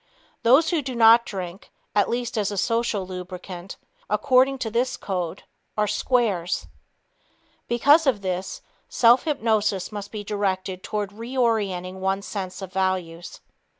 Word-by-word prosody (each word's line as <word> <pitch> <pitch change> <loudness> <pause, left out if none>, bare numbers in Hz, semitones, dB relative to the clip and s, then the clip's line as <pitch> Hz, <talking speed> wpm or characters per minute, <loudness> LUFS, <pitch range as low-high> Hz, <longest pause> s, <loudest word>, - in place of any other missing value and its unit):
Those 270 +9 +5
who 335 -3 +1
do 260 -2 -5
not 230 0 +6
drink, 185 -1 -7 0.2
at 205 -1 +2
least 240 0 -2
as 210 -3 0
a 205 - -5
social 230 -2 0
lubricant, 180 0 -8 0.3
according 270 0 +3
to 230 -4 -4
this 245 +3 0
code, 180 -3 -4 0.3
are 210 - +3
"squares." 210 -5 0 1.0
Because 285 +6 +4
of 210 -7 +1
this, 185 0 -3 0.3
self 240 +4 +5
hypnosis 220 - 0
must 205 -1 -7
be 215 -2 -5
directed 190 -2 -2
toward 205 -1 -3
reorienting 215 -6 -1
one's 195 +1 -1
sense 190 -1 -5
of 190 0 -8
values. 185 -3 -2
205 Hz, 135 wpm, -24 LUFS, 185-235 Hz, 1.0 s, not